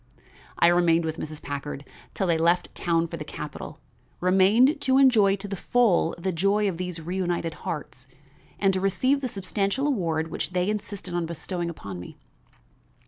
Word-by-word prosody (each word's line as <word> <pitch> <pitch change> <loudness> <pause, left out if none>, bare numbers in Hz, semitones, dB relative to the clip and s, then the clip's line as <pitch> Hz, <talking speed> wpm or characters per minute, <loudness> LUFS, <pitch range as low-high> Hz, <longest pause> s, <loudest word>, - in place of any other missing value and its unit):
I - - +4
remained 170 -1 +4
with 160 0 -3
Mrs. 155 -1 -7
Packard 145 0 -5 0.3
till 195 - 0
they 170 -2 +2
left 170 +2 +2
town 165 -1 +1
for 165 - -6
the - - -5
capital; - - -7 0.4
remained 205 - +4
to 260 -1 +3
enjoy 225 -8 +5
to 200 +1 -7
the 200 - -4
full 200 -5 +2
the 185 +2 -2
joy 200 +5 +2
of 185 -4 -2
these 180 -1 -4
reunited 175 -1 -2 0.2
hearts, 140 -4 -6 0.5
and 195 -1 +2
to 185 - -1
receive 255 +9 +1
the 260 - -1
substantial 200 +5 -1
reward 165 - 0
which 180 - -4
they 180 +3 +1
insisted 205 -3 -5
on 175 -1 -1
bestowing 170 +1 -4
upon 100 - -7
me. 90 - -10
180 Hz, 170 wpm, -26 LUFS, 165-200 Hz, 0.5 s, enjoy